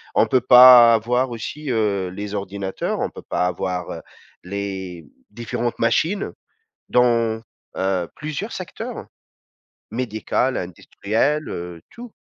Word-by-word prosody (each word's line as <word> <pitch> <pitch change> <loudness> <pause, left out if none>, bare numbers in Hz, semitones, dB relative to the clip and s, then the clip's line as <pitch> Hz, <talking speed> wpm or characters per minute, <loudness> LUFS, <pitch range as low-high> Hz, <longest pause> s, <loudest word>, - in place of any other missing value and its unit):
on - - +5
peut 130 - +2
pas 125 -1 +9
avoir 125 +3 0
aussi, 135 +5 -6
heu, 105 -5 0
les 100 +3 -6
ordinateurs, 100 -1 -4
on - - -2
peut - - -10
pas - - -1
avoir, 90 0 -3
heu, - - -7 0.4
les 95 -3 -6 0.2
différentes 120 +2 -4
machines 160 - 0 0.6
dans, 115 -2 +2 0.3
heu, 95 -2 -1
plusieurs 155 +9 -5
secteurs, 185 -3 -7 0.9
médical, 125 +2 -1
industriel, 110 - -2
heu, 85 -1 -6
tout. 240 -1 -12
115 Hz, 115 wpm, -21 LUFS, 95-125 Hz, 0.9 s, pas